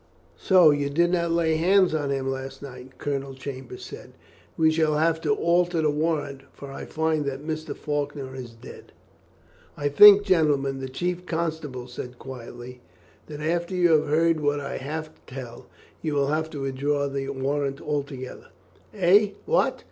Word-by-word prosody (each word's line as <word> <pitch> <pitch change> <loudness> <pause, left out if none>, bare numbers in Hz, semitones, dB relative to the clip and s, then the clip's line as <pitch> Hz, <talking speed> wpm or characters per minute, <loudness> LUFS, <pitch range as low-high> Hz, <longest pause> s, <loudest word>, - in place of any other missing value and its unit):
"So 180 -5 +6
you 145 -1 0
did 170 +4 +2
not 170 -2 +1
lay 165 -1 +2
hands 185 +1 +4
on 145 -3 -1
him 135 -1 -1
last 135 +1 -6
night," 130 -1 -11
Colonel 140 -1 -3
Chambers 130 -2 -8
said. - - -11 0.4
"We 160 -1 +4
shall 155 -1 +1
have 160 +1 +1
to - - 0
alter 175 -2 +1
the 150 - +3
warrant, 150 -3 -1
for 140 -1 -10
I - - -7
find 160 -1 0
that 140 +1 -4
Mr. 155 0 -4
Faulkner 145 -3 -3
is 130 -2 -7
dead." 115 0 -13 0.8
"I 145 0 0
think, 205 +7 +9
gentlemen," 145 -8 +2
the 130 0 -5
chief 180 +5 -3
constable 160 -6 -3
said 125 0 -8
quietly, 125 -1 -9 0.5
"that 150 -1 -8
after 170 +3 -1
you 175 -2 +3
have 155 -1 +3
heard 165 +2 +2
what 145 -1 0
I 140 -1 -5
have 155 +3 -5
to - - -29
tell, 120 -3 -8 0.3
you 155 -3 -2
will 140 -1 +1
have 155 +1 -1
to 145 -3 -7
withdraw 140 +2 -1
the 135 0 -4
warrant 140 +1 -2
altogether." 140 -3 -5 0.5
"Eh! 200 +2 +4
what? 480 +4 +1
145 Hz, 170 wpm, -25 LUFS, 135-165 Hz, 0.8 s, think